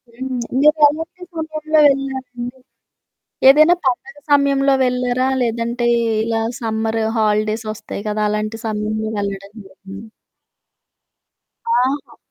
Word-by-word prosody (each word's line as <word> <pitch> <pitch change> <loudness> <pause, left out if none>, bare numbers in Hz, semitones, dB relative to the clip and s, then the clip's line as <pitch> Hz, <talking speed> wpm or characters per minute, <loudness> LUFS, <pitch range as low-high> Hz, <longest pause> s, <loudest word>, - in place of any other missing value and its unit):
హ్మ్. 260 0 -4 0.2
మీరు 300 +2 +5
ఎలాంటి 325 +4 -5
సమయంలో 310 -1 -1
వెళ్లారండి? 260 -2 -3 0.9
ఏదైనా 310 +5 +7
పండగ 295 +9 -1 0.2
సమయంలో 275 -1 +3
వెళ్లారా? 250 +1 0
లేదంటే, 235 +1 -1 0.4
ఇలా 225 -1 -1 0.2
సమ్మరు 220 0 -1
హాలిడేస్ 215 +1 0
వస్తాయి 205 -1 -8
కదా! 210 0 -1
అలాంటి 215 +1 -3
సమయంలో 215 0 -2
వెళ్ళడం 200 0 -5
జరిగిందా? 195 +3 -12 1.7
ఆహా! 270 +3 -1
245 Hz, 100 wpm, -19 LUFS, 215-275 Hz, 1.7 s, ఏదైనా